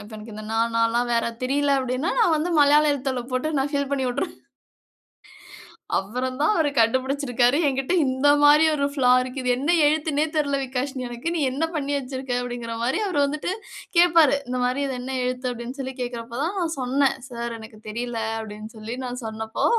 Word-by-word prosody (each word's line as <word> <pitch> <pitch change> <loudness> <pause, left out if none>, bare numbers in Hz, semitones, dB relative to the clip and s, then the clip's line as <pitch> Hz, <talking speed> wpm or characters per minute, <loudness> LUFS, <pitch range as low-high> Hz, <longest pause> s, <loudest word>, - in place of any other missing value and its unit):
இப்ப 205 - -13
எனக்கு 215 +1 -10
இந்த 215 - -7
நா 225 - 0 0.2
நான்லாம் 230 +1 +2
வேற 230 - +2 0.2
தெரில 280 +3 +1
அப்டின்னா, 255 +5 -1
நான் 355 -9 +4
வந்து 310 +3 -1
மலையாள 295 +1 +5
எழுத்தில 265 -2 -2
போட்டு 255 +4 -1
நான் 270 +1 0
ஃபில் 280 -1 0
பண்ணி 275 -2 0
வுட்டுருவேன். 250 +9 -3 1.6
அப்புறம் 250 +6 -3
தான் 305 - +4
அவரு 315 -3 +2
கண்டுபிடிச்சிருக்காரு. 255 +1 +2
எங்கிட்ட 270 +5 0
இந்த 260 +2 +1 0.2
மாரி 300 +2 +7
ஒரு 280 -2 +1
ஃபிளா 255 -3 +3
இருக்கு. 255 +1 -5
"இது 250 - 0
என்ன 280 +4 -2 0.2
எழுத்துன்னே 300 0 +2
தெரில 280 -2 +1
விகாஷினி 260 0 -3
எனக்கு. 240 +8 -4
நீ - - 0
என்ன 275 +5 -2
பண்ணி 285 -1 -1
வச்சிருக்க?" 260 -2 -3
அப்டிங்கிற 240 -2 -5
மாரி 260 - +1
அவர் 360 -6 0
வந்துட்டு 300 +4 -3 0.5
கேப்பாரு. 335 -4 +6
இந்த 250 0 -2
மாரி 255 +3 0
இது 265 - -3
என்ன 260 +1 -4
எழுத்து 250 0 -2
அப்டின்னு 245 +3 -7
சொல்லி 265 0 -5
கேக்கறப்போ 235 -1 -5
தான் 355 +5 -2
நான் 330 -2 -1
சொன்னே. 265 +2 +2 0.2
"சார் 235 -1 -4
எனக்கு 220 0 -12
தெரில" 235 +2 -4 0.2
அப்டின்னு 215 0 -8
சொல்லி 220 +2 -6
நான் 250 0 -5
சொன்னப்போ, 220 0 -3
260 Hz, 180 wpm, -24 LUFS, 240-285 Hz, 1.6 s, மாரி